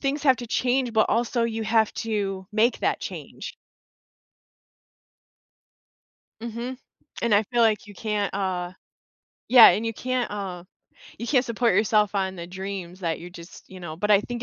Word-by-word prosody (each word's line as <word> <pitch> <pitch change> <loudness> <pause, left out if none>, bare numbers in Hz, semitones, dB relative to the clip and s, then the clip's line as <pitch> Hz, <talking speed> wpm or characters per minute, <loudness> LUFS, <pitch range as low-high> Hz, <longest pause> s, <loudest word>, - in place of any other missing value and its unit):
Things 280 +1 -1
have 265 -3 +5
to 240 - -6
change, 250 +1 0
but 220 - +4
also 235 +1 +1
you 225 -1 -2
have 220 0 +2
to 195 -4 -2
make 225 +3 +2
that - - +1
change. - - -8 2.9
Mhm. 235 +2 -5 0.4
And 235 -2 +2
I 205 - +4
feel 240 +3 0
like 215 -3 +2
you 205 - -11
can't, 210 0 -2
uh 185 -3 -2 0.8
Yeah, 245 -2 +10
and 220 - 0
you 225 - -2
can't, 255 +2 -2
uh 190 -4 -5 0.6
you 235 - -5
can't 255 -1 +3
support 235 -3 +1
yourself 210 0 +2
on 190 -1 -1
the 170 -1 -7
dreams 190 0 -7
that 165 -3 -2
you're 175 +1 -9
just 170 0 -12
you 185 -1 -11
know, 160 -3 -7
but 210 +5 -1
I 200 -1 +6
think 240 +2 -6
215 Hz, 165 wpm, -25 LUFS, 190-235 Hz, 2.9 s, Yeah